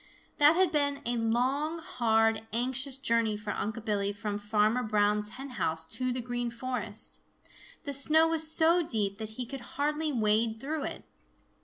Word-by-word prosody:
That 295 +2 +7
had 370 -1 +3
been 285 -2 0
a 240 +1 0
long, 255 +8 0
hard, 225 -7 +1
anxious 260 +3 -1
journey 230 -5 +1
for 210 0 -5
Unc' 220 +2 -4
Billy 200 -2 0
from 205 0 -4
Farmer 210 +3 +1
Brown's 210 -2 +1
hen 270 +1 -7
house 160 0 0
to 255 +9 -2
the 250 0 -2
Green 245 0 -2
Forest. 235 -3 -2 0.6
The 285 -3 -3
snow 310 +4 +4
was 320 -1 0
so 330 +2 +4
deep 210 -9 -2
that 220 0 -7
he 250 - -3
could 270 +2 -7 0.2
hardly 300 +2 0
wade 220 -1 +2
through 295 +3 -3
it. - - -6
240 Hz, 165 wpm, -29 LUFS, 215-285 Hz, 0.6 s, That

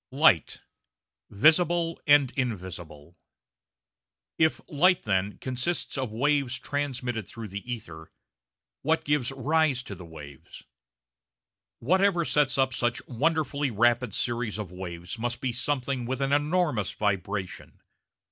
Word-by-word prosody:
LIGHT 130 - +3 0.7
VISIBLE 165 - +3
AND 145 -3 +6
INVISIBLE 90 - -5 1.2
If 160 -1 +3
Light, 180 +5 +3
then, 100 0 0
consists 130 +7 -2
of 130 -5 -2
waves 135 +1 +1
transmitted 125 -5 -3
through 115 -2 -8
the 100 +6 -6
ether, 80 -9 -7 0.7
what 160 +3 +1
gives 145 -4 0
rise 140 0 +1
to 105 - -8
the 90 - -10
waves? 75 -5 -12 1.1
Whatever 185 +4 +2
sets 145 -3 +2
up 130 -1 +2
such 120 0 -1
wonderfully 145 +2 0
rapid 120 0 +2
series 120 -3 -2
of 105 -5 -6
waves 90 +2 -7
must 120 +1 -2
be 130 - -1
something 130 -1 -2
with 130 0 -2
an 135 0 0
enormous 145 - +1
vibration. 100 -2 -3
125 Hz, 120 wpm, -27 LUFS, 105-145 Hz, 1.2 s, AND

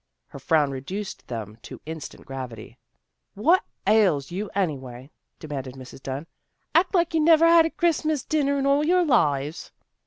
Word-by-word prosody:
Her - - -10
frown 145 +1 +2
reduced 185 +10 -6
them 110 -2 -6
to - - -10
instant 160 -2 -8
gravity. 130 -5 -8 0.3
" - - -55
What 355 +4 +5 0.2
ails 190 -10 +3
you, 195 +4 -4
anyway? 135 -7 -3
" - - -51
demanded 135 -4 -6
Mrs. 130 0 -11
Dunn. 135 +4 -5 0.3
" - - -49
Act 365 +3 +3
like 345 -1 +2
you 325 - +2
never 320 +1 +5
had 335 -1 +6
a - - -5
Christmas 315 -4 0
dinner 280 -2 0
in 275 - -1
all 280 +1 +3
your 355 +3 +3
lives." 150 - 0
175 Hz, 175 wpm, -24 LUFS, -, 0.3 s, had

